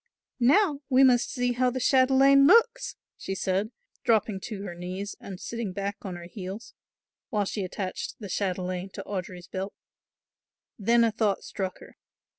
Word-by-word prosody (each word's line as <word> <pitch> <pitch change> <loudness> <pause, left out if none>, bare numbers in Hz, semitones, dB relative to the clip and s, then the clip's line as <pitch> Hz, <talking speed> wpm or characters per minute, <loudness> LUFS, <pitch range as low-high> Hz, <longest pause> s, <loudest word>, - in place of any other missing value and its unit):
"Now 290 - +4
we 260 0 +6
must 245 -2 +4
see 245 -1 0
how 250 +1 +2
the 255 +1 -3
chatelaine 270 +2 +5
looks," 465 +4 +4 0.2
she 195 - -4
said, 190 +3 0 0.3
dropping 215 -3 +2
to 205 -4 -6
her 185 -4 -5
knees 185 +3 -5
and 190 -2 -8
sitting 230 -5 -4
back 200 +1 -3
on 185 -3 -5
her 175 - -8
heels, 195 +4 -8 0.6
while 210 -2 0
she 200 +1 -3
attached 185 +1 -4
the 210 - -8
chatelaine 185 -1 -2
to 195 - -6
Audry's 180 -3 -5
belt. 190 +2 -5 1.0
Then 235 +3 +4
a 230 - +3
thought 210 -3 0
struck 190 -2 -4
her. - - -14
205 Hz, 160 wpm, -27 LUFS, 190-245 Hz, 1.0 s, we